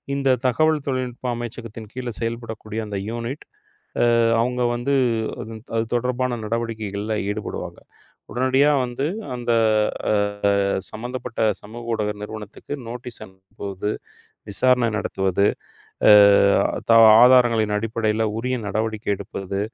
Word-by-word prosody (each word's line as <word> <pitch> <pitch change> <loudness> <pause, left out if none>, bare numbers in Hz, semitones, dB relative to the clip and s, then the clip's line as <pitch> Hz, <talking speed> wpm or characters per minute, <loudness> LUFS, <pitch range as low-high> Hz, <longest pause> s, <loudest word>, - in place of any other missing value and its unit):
இந்த 135 -1 0 0.2
தகவல் 155 +4 +2
தொழில்நுட்ப 130 -1 -3
அமைச்சகத்தின் 115 -2 -8
கீழ 130 -1 -4
செயல்படக்கூடிய 115 -1 -4
அந்த 100 -1 -4
யூனிட் 120 +5 -5 0.6
அ, - - +5 0.3
அவுங்க 125 +1 0
வந்து 120 +4 -1 0.5
அதன் 110 -1 -8
அது 115 0 +1
தொடர்பான 125 0 0
நடவடிக்கைகள்ல 110 -2 -3 0.2
ஈடுபடுவாங்க. 105 +1 -5 0.5
உடனடியா 130 +4 +3
வந்து 125 +3 -3 0.3
அந்த 120 -1 -4 0.6
அ, - - +3 0.8
சம்பந்தப்பட்ட 120 +1 -7 0.2
சமூக 115 +3 -9
ஊடக 105 -1 -1
நிறுவனத்துக்கு 110 +5 -7
நோட்டீஸ் 120 0 -8
அனுப்புவது, 95 +1 -6 0.6
விசாரணை 125 +3 +3
நடத்துவது, 95 -2 0 0.6
அ, - - +9 0.8
தா 115 - +7 0.3
ஆதாரங்களின் 120 -4 +5
அடிப்படையில 110 0 -1
உரிய 125 +2 -1
நடவடிக்கை 110 +1 -2
எடுப்பது, 100 0 -5
115 Hz, 105 wpm, -22 LUFS, 105-125 Hz, 0.8 s, அ